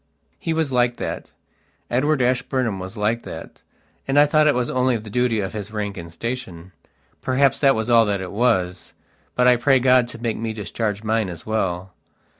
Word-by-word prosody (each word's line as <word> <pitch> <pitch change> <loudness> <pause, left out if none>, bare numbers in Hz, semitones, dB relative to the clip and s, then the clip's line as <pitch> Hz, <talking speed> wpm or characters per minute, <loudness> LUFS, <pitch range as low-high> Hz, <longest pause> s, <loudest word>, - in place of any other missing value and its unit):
He 165 - -3
was 160 -3 0
like 120 -1 +2
that. - - -5 0.6
Edward 135 +2 +2
Ashburnham 125 -4 0
was 95 +4 -7
like 110 +3 0
that, - - -9 0.5
and 135 +1 +1
I 145 - +8
thought 155 +1 +3
it 145 - +4
was 125 -1 0
only 125 -1 +1
the 105 -1 -10
duty 125 -2 +1
of 95 - -4
his 105 -2 -5
rank 105 -2 -4
and 85 -2 -8
station. 95 -4 -6 0.5
Perhaps 135 +1 +2
that 135 -2 +4
was 110 0 -2
all 115 -2 +5
that 100 -1 0
it 95 -1 -6
wasbut 100 +2 -2
I 125 -1 +6
pray 135 +2 +4
God 125 -1 +4
to 120 - -10
make 115 -1 -2
me 115 -1 -3
discharge 105 0 -3
mine 110 -2 0
as 85 -2 -9
well. 95 -4 -2
115 Hz, 190 wpm, -22 LUFS, 105-125 Hz, 0.6 s, I